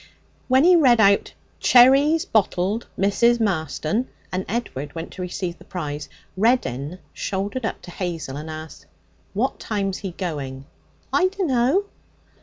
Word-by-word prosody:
When 260 Hz, +2 st, +4 dB
he 360 Hz, +1 st, +7 dB
read 255 Hz, -8 st, +5 dB
out, 200 Hz, -1 st, +4 dB, 0.3 s
'Cherries, 275 Hz, +6 st, +6 dB
bottled. 205 Hz, +1 st, 0 dB
Mrs. 235 Hz, +5 st, +3 dB
Marston,' 190 Hz, -, -1 dB, 0.2 s
and 185 Hz, +1 st, -2 dB
Edward 175 Hz, -, -4 dB
went 165 Hz, 0 st, -6 dB
to 185 Hz, -, -8 dB
receive 180 Hz, -1 st, -4 dB
the -, -, -14 dB
prize, 150 Hz, -5 st, -5 dB, 0.3 s
Reddin 185 Hz, -, 0 dB, 0.2 s
shouldered 205 Hz, +5 st, -3 dB
up -, -, -6 dB
to 175 Hz, -, -9 dB
Hazel 170 Hz, -7 st, -4 dB
and 155 Hz, +2 st, -6 dB
asked: 155 Hz, 0 st, -9 dB, 0.5 s
'What -, -, 0 dB
time's 195 Hz, -3 st, -2 dB
he 190 Hz, -4 st, -5 dB
going?' 140 Hz, -7 st, -5 dB, 0.5 s
'I 370 Hz, -, +4 dB
dunno.' 360 Hz, -2 st, +1 dB
195 Hz, 135 wpm, -23 LUFS, 165-245 Hz, 0.5 s, he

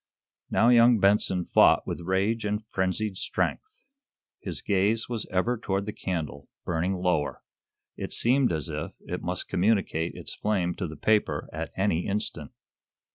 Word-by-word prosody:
Now, 115 Hz, -, +4 dB
young 120 Hz, 0 st, +6 dB
Benson 95 Hz, -2 st, +3 dB
fought -, -, +5 dB
with -, -, -4 dB
rage 95 Hz, +6 st, 0 dB
and 105 Hz, +1 st, -2 dB
frenzied 95 Hz, 0 st, -1 dB
strength. 430 Hz, -, -3 dB, 0.6 s
His -, -, -6 dB
gaze 105 Hz, +3 st, +1 dB
was 115 Hz, -3 st, -4 dB
ever 110 Hz, +6 st, 0 dB
toward 100 Hz, -2 st, -1 dB
the 105 Hz, -, -4 dB
candle, 75 Hz, -6 st, -4 dB, 0.2 s
burning 90 Hz, +3 st, 0 dB
lower. 90 Hz, -5 st, -1 dB, 0.5 s
It -, -, -5 dB
seemed 130 Hz, +2 st, +2 dB
as 80 Hz, -4 st, -2 dB
if -, -, -5 dB
it -, -, -5 dB
must -, -, -3 dB
communicate 90 Hz, -4 st, +1 dB
its -, -, -7 dB
flame 95 Hz, -5 st, 0 dB
to 90 Hz, -, -2 dB
the 80 Hz, -, -9 dB
paper 110 Hz, -1 st, +1 dB
at 80 Hz, +1 st, -4 dB
any 95 Hz, -3 st, +1 dB
instant. 105 Hz, +2 st, -3 dB
100 Hz, 150 wpm, -27 LUFS, 90-110 Hz, 0.6 s, young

